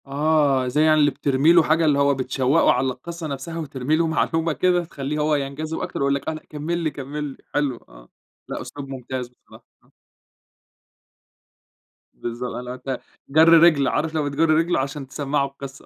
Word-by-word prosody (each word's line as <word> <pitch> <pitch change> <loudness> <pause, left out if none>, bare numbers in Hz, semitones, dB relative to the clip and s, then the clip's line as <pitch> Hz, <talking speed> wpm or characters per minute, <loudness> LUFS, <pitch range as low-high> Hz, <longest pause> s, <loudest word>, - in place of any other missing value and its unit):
آه، 140 -2 +2
زي 150 +5 +2
يعني 155 0 +4
اللي 145 -1 +4
بترمي 140 +5 +2
له 170 -1 +6
حاجة 160 +2 +2
اللي 145 -2 +3
هو 140 0 +4
بتشوقه 130 +3 +2
على 130 +2 +1
القصّة 160 +6 -6
نفْسها 150 +4 -5
وترمي 140 -1 -1
له 165 +1 +1
معلومة 165 0 0
كده، 180 +1 +2
تخلّيه 150 -1 -4
هو 150 0 +2
ينجذب 145 +3 -4
أكتر - - -5
ويقول 140 0 +2
لك: 140 - -6
"آه - - -2
لأ 155 - -8
كمل 155 +3 -3
لي 165 -3 -1
كمل 145 +2 -6
لي" 140 -2 -6 0.2
حلو 140 -4 0
آه، - - -16 0.4
لأ - - -4
أسلوب 145 -1 -8
ممتاز 130 -1 -5
بصراحة. 125 - -19 0.2
آه. - - -29 2.2
بالضبط 120 +1 -5
اللي 125 0 -6
هو - - -4
أنت 130 +1 -5 0.3
جَر 160 +4 +6
رجل، 165 -4 +6
عارف 160 +1 -1
لمّا 155 -2 0
بتجُر 155 +3 +1
رجله 165 +3 +2
عشان 135 +1 -4
تسمَّعه 140 +1 -1
القصّة. 140 0 -10
145 Hz, 185 wpm, -22 LUFS, 135-155 Hz, 2.2 s, له